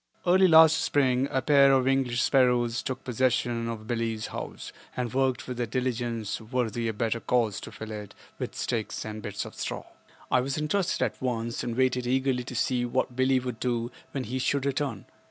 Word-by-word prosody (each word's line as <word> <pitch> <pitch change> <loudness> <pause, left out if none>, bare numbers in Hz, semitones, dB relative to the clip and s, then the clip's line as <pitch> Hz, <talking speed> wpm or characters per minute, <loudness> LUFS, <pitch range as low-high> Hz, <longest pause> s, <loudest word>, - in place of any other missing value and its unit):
Early 185 +1 +5
last 160 -1 +7
spring 130 -2 +2
a 130 - -1
pair 140 -2 +6
of 130 -1 +3
English 130 -3 +2
sparrows 125 -3 +3
took 130 0 -5
possession 120 -1 0
of 110 -2 -6
Billie's 115 -2 -2
house - - -7 0.2
and 125 -3 -2
worked 130 -1 0
with 125 -1 -5
a 120 - 0
diligence 120 -3 -2
worthy 115 0 -2
a - - +1
better 115 +2 -1
cause 115 -4 +1
to - - -8
fill 110 0 -8
it 105 -2 -7 0.2
with - - -4
sticks 110 -2 -3
and 110 0 -6
bits 105 - -4
of - - -9
straw. - - -5 0.5
I 130 - +4
was 135 +2 -2
interested 160 +5 0
at - - -5
once 115 -2 -2
and 120 -1 -3
waited 125 -1 +1
eagerly 130 0 +1
to 125 - -7
see 125 +1 +1
what 120 0 -1
Billie 130 +1 +3
would 125 -3 -5
do 120 -1 -1 0.2
when 135 - -3
he 125 +3 -3
should 135 +1 0
return. 135 -6 -2
125 Hz, 190 wpm, -27 LUFS, 115-130 Hz, 0.5 s, last